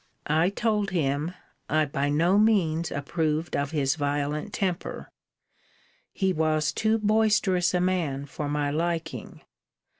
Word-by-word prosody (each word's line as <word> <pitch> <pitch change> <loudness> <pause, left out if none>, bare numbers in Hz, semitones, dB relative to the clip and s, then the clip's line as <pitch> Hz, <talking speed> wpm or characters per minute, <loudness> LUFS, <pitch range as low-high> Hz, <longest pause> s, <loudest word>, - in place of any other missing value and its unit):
I 160 +4 +2
told 210 -1 0
him, 155 -1 -1 0.3
I 155 0 +3
by 140 0 -1
no 170 +7 +3
means 170 -7 +2
approved 155 +3 -1
of 140 0 -1
his 140 -3 +1
violent 145 +5 -2
temper: 185 -3 -3 1.0
he 190 -2 0
was 155 -1 +1
too 220 0 +2
boisterous 210 -4 +2
a 180 - +2
man 165 -7 0
for 145 +1 -5
my 145 -1 0
liking. 160 -4 -3
160 Hz, 125 wpm, -26 LUFS, 145-185 Hz, 1.0 s, I